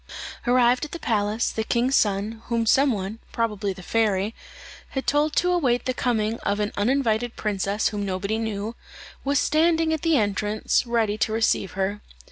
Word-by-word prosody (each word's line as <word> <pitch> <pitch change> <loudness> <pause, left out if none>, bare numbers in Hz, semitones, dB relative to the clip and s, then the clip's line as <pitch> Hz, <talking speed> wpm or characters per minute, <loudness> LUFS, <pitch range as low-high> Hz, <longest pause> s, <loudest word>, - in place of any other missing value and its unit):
Arrived 245 +1 +4
at 300 - -6
the - - -3
palace, 215 -2 0
the 220 - -2
king's 245 +4 +1
son, 210 +1 +1
whom 230 -1 0
some 270 +5 +4
one, 205 +1 -4
probably 210 -3 -1
the 185 -1 -9
fairy, 210 -1 +1 0.6
had 265 - -4
told 295 +1 +1
to 360 +1 +2
await 260 -9 +1
the 255 - 0
coming 230 -3 0
of 205 - -1
an 210 0 -1
uninvited 240 0 +1
princess 205 0 0
whom 205 -1 -3
nobody 200 +3 -2
knew, 220 0 -3 0.5
was 280 +1 +1
standing 320 +2 +2
at 315 - -2
the 330 -3 +3
entrance, 210 +2 0
ready 220 -3 0
to 220 - +1
receive 220 -4 +1
her. 195 +2 -2
225 Hz, 170 wpm, -24 LUFS, 205-255 Hz, 0.6 s, Arrived